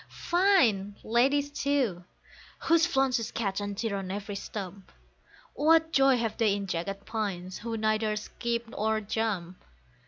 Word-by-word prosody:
Fine 260 - +3
ladies, 275 +5 +2
too, 275 -11 0 0.6
whose 330 +1 +4
flounces 265 -7 +1
catch 200 -3 -2
and 205 -1 -4
tear 215 -2 -1
on 190 -1 -5
every 200 +1 -4
stump, 195 -1 -7 0.6
What 320 +2 +3
joy 270 -1 +5
have 225 -2 -2
they 215 -3 +3
in 200 -1 -4
jagged 195 +2 -4
pines, 190 -4 -4
who 230 0 -4
neither 215 0 +1
skip 235 +2 -3
nor 220 -1 0
jump? 200 -4 -3
220 Hz, 135 wpm, -28 LUFS, 200-265 Hz, 0.6 s, joy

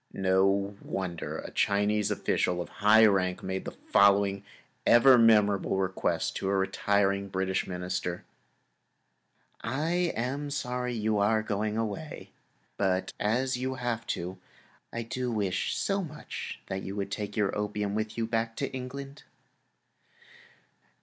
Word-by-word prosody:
No 95 +1 +2
wonder 90 -3 -4
a - - -7
Chinese 105 +1 +1
official 90 -3 0
of 85 - -4
high 110 +2 +7
rank 95 -3 +2
made 95 0 -3
the - - -6 0.2
following 100 0 +4 0.4
ever 125 +2 +7
memorable 105 -5 +4
request 95 -1 -1
to 95 - -2
a 100 - +2
retiring 100 0 +1
British 95 0 -1
Minister: 90 -1 -3 1.4
"I 165 +8 0
am 135 +5 -2
sorry 125 -3 -2
you 110 -1 0
are 110 +2 +2
going 105 0 -1
away, 115 +8 -4 0.5
but 95 -1 0
as 125 +5 +1
you 130 +1 -2
have 120 -2 -3
to, 90 +2 -6 0.5
I 115 - -3
do 125 +2 -3
wish 100 -5 -1
so 195 0 0
much 155 -2 -7
that 95 0 -4
you 95 +1 -6
would 100 -1 -3
take 105 0 -4
your 105 -2 +1
opium 105 -1 -2
with 110 +1 -3
you 115 - 0
back 115 0 -1
to 135 - -3
England!" 135 +2 -7
105 Hz, 135 wpm, -29 LUFS, 95-120 Hz, 1.4 s, high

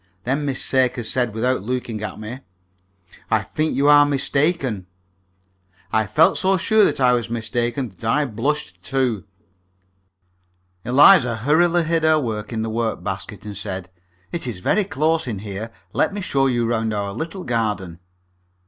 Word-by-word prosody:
Then 140 +5 -1
Miss 135 -2 -1
Sakers 125 -3 +1
said, 125 -3 0
without 125 +3 0
looking 115 -1 -4
at 105 - -5
me, 110 +4 -7 0.9
"I - - +2
think 155 +1 -2
you 140 +1 +2
are 145 0 +8
mistaken." 140 - 0 1.1
I 110 -1 +2
felt 160 +10 +3
so 190 0 +2
sure 220 +4 +3
that 145 -1 0
I 125 -2 +4
was 120 -2 -1
mistaken 120 +2 -2
that 95 +2 -18
I 145 +7 +2
blushed, 115 -6 -3
too. 125 -5 -1 1.6
Eliza 130 -1 +6
hurriedly 165 +8 +2
hid 165 0 0
her 155 0 +4
work 110 -5 -4
in 110 -1 -2
the 110 - -3
work 115 0 -2
basket, 100 +2 -6
and 105 -1 -6
said, 95 -2 -6 0.4
"It 170 -6 -2
is 110 -7 -5
very 205 - +1
close 160 -4 0
in 110 -4 -3
here. 100 +2 -6 0.2
Let 200 - +1
me 205 - -3
show 135 -7 +1
you 120 -2 +1
round 115 -2 -1
our 100 -1 -3
little 165 - -5
garden." 105 - -2
125 Hz, 160 wpm, -21 LUFS, 110-145 Hz, 1.6 s, are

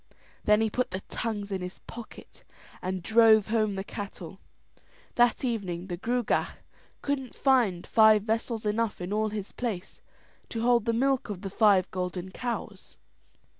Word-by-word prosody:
Then 210 +1 +5
he 220 - +2
put 250 +3 0
the 185 +1 -4
tongues 205 -3 -4
in 190 -1 -2
his 180 +1 -6
pocket 235 -1 -12 0.4
and 185 -1 -3
drove 220 0 +5
home 215 -3 +1
the 195 - -3
cattle. 195 -3 -8 0.7
That 240 +2 +3
evening 190 -8 -2
the 175 - -2
Gruagach 240 +4 0 0.5
couldn't 270 -3 -2
find 240 -10 +2
vessels 220 +1 +3
enough 215 +1 0
in 180 +3 -4
all 215 +1 +1
his 210 -2 -5
place 215 -7 -5 0.5
to 225 -1 -3
hold 240 -2 +3
the 230 - +2
milk 265 +1 +1
of 200 -1 -6
the 195 - -4
five 200 -3 +4
golden 180 0 -4
cows. 240 +3 -5
215 Hz, 150 wpm, -28 LUFS, 190-235 Hz, 0.7 s, Then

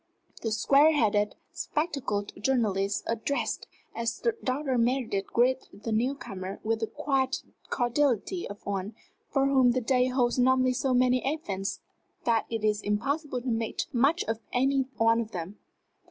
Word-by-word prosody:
The 225 - -2
square 280 +8 +5
headed, 210 -6 +2 0.2
spectacled 275 -10 -2
journalist 210 -4 +1
addressed 230 +5 -2 0.3
as 230 - -3 0.2
Dr. 260 -1 0
Meredith 230 -5 0
greeted 245 -4 0
the 225 - -2
new 245 +6 +1
comer 190 -7 -7
with 225 0 0
the 225 - -1
quiet 265 0 -1 0.3
cordiality 260 - 0
of 205 +1 -10
one 200 +1 -3 0.3
for 275 -1 +2
whom 260 -3 +4
the 255 - +1
day 250 +1 +2
holds 250 -1 +1
normally 255 0 +4
so 260 0 +1
many 250 0 +3
events 195 -11 -4 0.4
that 230 -2 +1
it 225 -2 -3
is 210 -1 +2
impossible 260 +6 -1
to 255 - -3
make 225 -1 -1
much 280 +8 +3
of 225 0 -2
any 265 +1 +2
one 230 +1 +4
of 225 -1 -7
them. 180 +3 -6
240 Hz, 150 wpm, -28 LUFS, 215-265 Hz, 0.4 s, square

